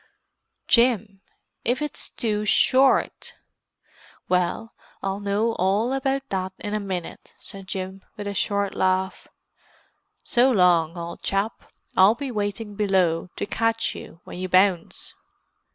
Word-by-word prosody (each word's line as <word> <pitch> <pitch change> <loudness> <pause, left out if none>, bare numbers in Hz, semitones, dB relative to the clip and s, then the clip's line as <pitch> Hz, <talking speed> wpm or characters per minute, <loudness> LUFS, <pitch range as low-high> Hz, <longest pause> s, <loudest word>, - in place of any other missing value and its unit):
"Jim—if 230 +1 0
it's 300 -1 -4
too 210 -3 -1
short!" 260 +5 +3 0.9
"Well, 180 +5 0 0.3
I'll 195 0 -2
know 205 +3 0
all 200 +7 +2
about 270 0 -1
that 190 -1 -2
in 205 - -5
a 215 - 0
minute," 190 -4 -6
said 195 -1 -9
Jim 190 -1 -5
with 205 - -5
a 205 - -3
short 200 0 0
laugh. 190 0 0 1.0
"So 250 0 +3
long, 175 -5 +3
old 170 0 -6
chap: 200 +3 -2 0.2
I'll 195 +4 +6
be 270 +1 -5
waiting 205 0 -3
below, 190 -5 +1
to - - -3
catch 225 +2 0
you 165 - -11
when - - -9
you 185 0 -3
bounce!" 185 -2 +2
200 Hz, 125 wpm, -24 LUFS, 185-225 Hz, 1.0 s, I'll